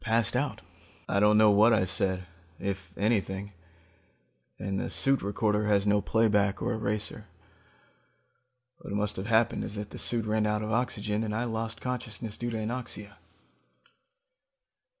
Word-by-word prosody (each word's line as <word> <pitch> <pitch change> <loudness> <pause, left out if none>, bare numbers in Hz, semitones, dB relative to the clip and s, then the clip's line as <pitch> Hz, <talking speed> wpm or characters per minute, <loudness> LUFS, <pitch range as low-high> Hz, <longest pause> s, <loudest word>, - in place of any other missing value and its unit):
I - - -18
passed 115 0 +1
out. 140 +3 -1 0.4
I 100 - +1
don't 105 +1 +5
know 110 -1 +7
what 110 +3 +6
I 95 - +2
said, 95 0 -1 0.3
if 95 -2 -4
anything, 100 -2 0 1.1
and 95 0 -2
the - - -3
suit 135 0 +2
recorder 105 +1 0
has 100 -1 +3
no 105 0 +3
playback 105 -2 +2
or 120 +1 -1
eraser. 105 -1 -3 1.5
What - - -7
must 105 0 0
have 95 +2 -4
happened 115 0 +2
is 105 - -5
that 105 0 -6
the - - -8
suit 115 -2 0
ran 110 0 +1
out 105 0 0
of 110 - -3
oxygen, 110 -2 0
and 105 -1 -2
I 115 - 0
lost 115 -1 -3
consciousness 115 -3 -4
due 120 - -3
to 115 - -3
anoxia. 110 -2 -5
105 Hz, 155 wpm, -29 LUFS, 100-115 Hz, 1.5 s, know